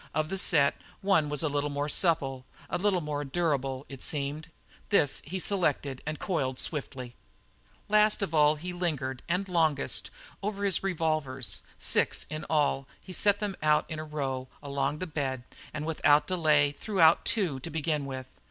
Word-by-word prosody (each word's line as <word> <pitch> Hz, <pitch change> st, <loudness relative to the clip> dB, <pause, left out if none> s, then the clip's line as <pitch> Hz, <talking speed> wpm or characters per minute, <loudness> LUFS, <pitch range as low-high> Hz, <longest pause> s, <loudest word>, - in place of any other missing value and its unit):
Of 155 Hz, 0 st, 0 dB
the 195 Hz, -, -1 dB
set 145 Hz, -7 st, +4 dB, 0.2 s
one 190 Hz, -7 st, +3 dB
was 150 Hz, +2 st, -1 dB
a -, -, +2 dB
little 145 Hz, 0 st, -1 dB
more 145 Hz, 0 st, -2 dB
supple, 140 Hz, -5 st, +1 dB, 0.3 s
a -, -, 0 dB
little 190 Hz, -2 st, +2 dB
more 150 Hz, -1 st, -3 dB
durable, 135 Hz, -3 st, -1 dB
it 135 Hz, -2 st, -9 dB
seemed. 150 Hz, +2 st, -3 dB, 0.4 s
This 150 Hz, -9 st, +3 dB
he 185 Hz, +5 st, -3 dB
selected 150 Hz, -8 st, -1 dB
and 155 Hz, 0 st, -2 dB
coiled 135 Hz, -9 st, -1 dB
swiftly. 130 Hz, -5 st, -3 dB, 0.7 s
Last 210 Hz, 0 st, +4 dB
of 165 Hz, -, -3 dB
all 150 Hz, -1 st, +5 dB
he 180 Hz, +4 st, -6 dB
lingered 145 Hz, -8 st, -2 dB
and 180 Hz, +3 st, 0 dB
longest 160 Hz, -6 st, +1 dB, 0.3 s
over 200 Hz, 0 st, -3 dB
his 195 Hz, -4 st, +3 dB
revolvers. 155 Hz, -, -1 dB, 0.2 s
Six -, -, +1 dB
in 155 Hz, 0 st, -5 dB
all, 145 Hz, -3 st, +1 dB
he 185 Hz, -, -10 dB
set 205 Hz, +2 st, +3 dB
them 205 Hz, -2 st, -2 dB
in 155 Hz, 0 st, +2 dB
a -, -, -4 dB
row 135 Hz, -4 st, -3 dB, 0.2 s
along 140 Hz, +1 st, -1 dB
the 185 Hz, -, -3 dB
bed 135 Hz, -6 st, -3 dB, 0.3 s
and 155 Hz, 0 st, -4 dB
without 150 Hz, -2 st, +3 dB
delay 155 Hz, -5 st, +3 dB
threw 195 Hz, +7 st, -4 dB
out 160 Hz, 0 st, +6 dB
two 185 Hz, -12 st, +1 dB
to 150 Hz, -, -6 dB
begin 150 Hz, -2 st, -1 dB
with. 130 Hz, -1 st, -8 dB
150 Hz, 170 wpm, -29 LUFS, 140-175 Hz, 0.7 s, out